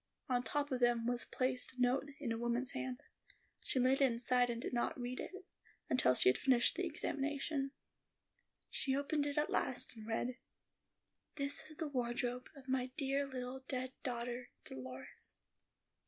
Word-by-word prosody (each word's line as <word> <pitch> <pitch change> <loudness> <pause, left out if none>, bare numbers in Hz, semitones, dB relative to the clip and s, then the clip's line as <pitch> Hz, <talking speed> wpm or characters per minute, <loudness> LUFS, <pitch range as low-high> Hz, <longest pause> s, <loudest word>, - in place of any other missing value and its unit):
On 250 -1 +2
top 285 +5 -1
of 255 - +1
them 240 -1 +4
was 245 0 +2
placed 255 0 +1
a 255 - -14
note 255 +3 +3
in 260 -5 -2
a 230 - 0
woman's 240 +3 0
hand. 260 -2 -3 0.6
She 260 - +1
laid 260 +2 +4
it 270 -2 +6
aside 245 +1 +3
and 235 -1 -1
did - - -4
not 240 +1 0
read 245 +1 -3
it, 380 -1 -6 0.5
until 180 - +5
she - - +5
had 125 - +3
finished 255 -3 +5
the - - -2
examination. 280 0 -1 1.0
She 265 -1 +2
opened 285 +1 +1
it 285 +1 -3
at 300 - +2
last, 255 -1 0
and 220 -1 -9
read, 240 +3 -1 1.0
"This 280 +1 -1
is 310 - -11
the 320 - -1
wardrobe 245 -1 -1
of 270 -1 -13
my 255 -1 +1
dear 275 0 +1
little 255 0 -4
dead 255 -1 -2
daughter 245 0 -3 0.2
Dolores." 130 0 -8
255 Hz, 170 wpm, -37 LUFS, 240-275 Hz, 1.0 s, it